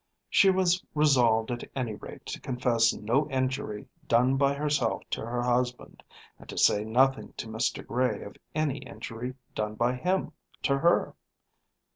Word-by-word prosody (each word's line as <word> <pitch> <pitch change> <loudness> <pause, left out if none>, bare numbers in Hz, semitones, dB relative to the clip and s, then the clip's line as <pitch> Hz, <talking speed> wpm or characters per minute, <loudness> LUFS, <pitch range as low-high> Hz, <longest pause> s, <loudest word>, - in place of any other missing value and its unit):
She 195 - +6
was 185 -1 +2
resolved 125 -7 +3
at 120 - -4
any 125 -5 -2
rate - - -10
to - - -6
confess 120 -3 +2
no 135 +8 0
injury 130 -5 -2 0.2
done 125 +3 +4
by 140 +1 +2
herself 145 -5 0
to - - -2
her 120 +1 -2
husband, 125 0 -1 0.4
and - - -15
to - - -7
say 105 - +4
nothing 130 +5 +2
to - - -5
Mr. 110 +1 -2
Gray 120 -4 0
of 100 - -10 0.2
any 150 -3 0
injury 125 -1 -7 0.2
done 105 0 -3
by 120 +3 +1
him 180 +9 -1 0.3
to 140 -1 +2
her. 170 +4 +3
125 Hz, 155 wpm, -28 LUFS, 115-140 Hz, 0.4 s, She